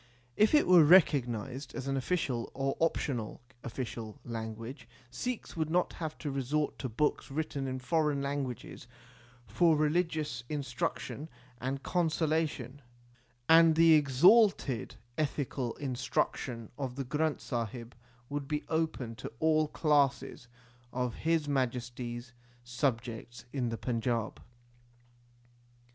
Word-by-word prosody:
If 215 +7 +4
it 300 - +5
were 180 -3 +8
recognized 135 - +3
as 130 - -4
an 135 - 0
official 135 -4 -1
or 135 0 -1
optional 135 -8 -1 0.2
official 115 -3 -6
anguage, 115 +2 -6 0.2
Sikhs 245 - -4
would 160 -2 -1
not 175 +2 +1
have 160 -2 -5
to 150 - -4
resort 140 +3 -1
to 130 - -3
books 150 +8 0
written 140 -1 -3
in 130 0 -3
foreign 150 +1 +1
languages 140 -4 -4 0.6
for 155 - +3
religious 155 -5 0
instruction 140 +2 -3 0.3
and 135 +2 -3
consolation, 155 -5 0 0.7
and 165 0 +7
the 165 0 +7
exalted 150 - +4 0.2
ethical 140 -4 -2
instruction 125 -3 -2
of 130 -3 -3
the 135 0 -3
Granth 150 +3 0
Sahib 120 -1 -4 0.3
would 145 0 -4
be 150 0 -2
open 160 -7 -1
to - - -7
all 155 -1 +3
classes 145 -5 +1 0.4
of 125 -2 -1
His 160 +1 0
Majesty 125 -3 -2
s 125 +1 -11 0.3
subjects 120 -1 -3
in 125 -4 -1
the 115 - -3
Panjab. 115 -2 -2
135 Hz, 120 wpm, -31 LUFS, 120-155 Hz, 0.7 s, were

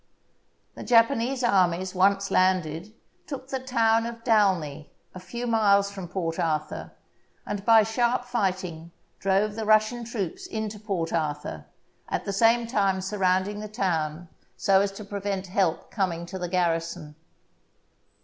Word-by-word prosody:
The - - -10
Japanese 245 +2 +3
armies, 185 -4 +2
once 195 +1 +2
landed, 185 0 +1 0.4
took 270 -2 -7
the 265 - -2
town 230 -3 +2
of 230 -1 -8
Dalny, 185 - +1 0.2
a 185 - -8
few 235 +7 -6
miles 200 -4 +3
from 190 -3 -7
Port 170 -2 -3
Arthur, 155 -2 -2 0.5
and 205 -1 -4
by 225 0 +6
sharp 240 +3 0
fighting 185 -8 -2 0.3
drove 195 +2 +1
the 220 +1 -4
Russian 215 +3 +3
troops 220 -7 -4
into 215 -1 -4
Port 195 -6 -3
Arthur, 150 - -3 0.4
at - - -2
the 200 - -2
same 230 +3 +4
time 200 -5 +1
surrounding 190 +1 0
the 215 - -5
town 170 -5 -2 0.3
so 190 +9 +4
as 200 0 0
to 210 +1 -9
prevent 200 -1 -3
help 185 -3 -1
coming 175 -5 -1
to 190 +2 -7
the 180 -1 -3
garrison. 165 -4 -1
195 Hz, 140 wpm, -26 LUFS, 180-225 Hz, 0.5 s, by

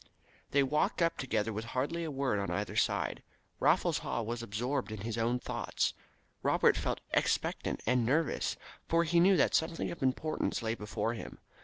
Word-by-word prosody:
They 140 0 +4
walked 150 +3 +1
up 165 - +1
together 110 -4 0
with 110 +2 -3
hardly 165 +6 0
a 160 - -3
word 135 -7 0
on 100 - -2
either - - -2
side. - - +1 0.4
Raffles - - +3
Haw 115 - -2
was 115 +2 -3
absorbed 120 +3 -2
in 110 -2 -5
his 110 +1 -3
own 115 +2 +1
thoughts. - - -1 0.5
Robert - - +4
felt - - -2
expectant - - 0
and 125 +1 +3
nervous, 145 +7 +1 0.3
for 165 +1 +3
he 170 +1 +3
knew 185 +2 +6
that 140 - +3
something 165 +1 0
of 170 - -8
importance 135 0 0
lay 110 0 0
before 110 +1 -2
him. 115 - -8
125 Hz, 175 wpm, -32 LUFS, 115-155 Hz, 0.5 s, knew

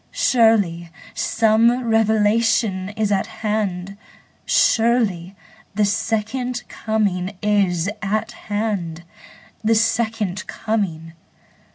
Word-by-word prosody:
Surely 205 -9 +2 0.2
some 230 +3 +2
revelation 220 -2 +2
is 215 -2 0
at 195 - +1 0.2
hand; 200 -3 -2 0.5
Surely 220 -6 +2 0.4
the 210 0 +3
Second 225 +4 -2
Coming 200 -3 -2
is 195 -4 +1
at 215 +1 -1
hand. 200 -6 -3 0.6
The 225 +1 +3
Second 220 -3 0
Coming! 185 -8 -3
210 Hz, 80 wpm, -21 LUFS, 190-225 Hz, 0.6 s, the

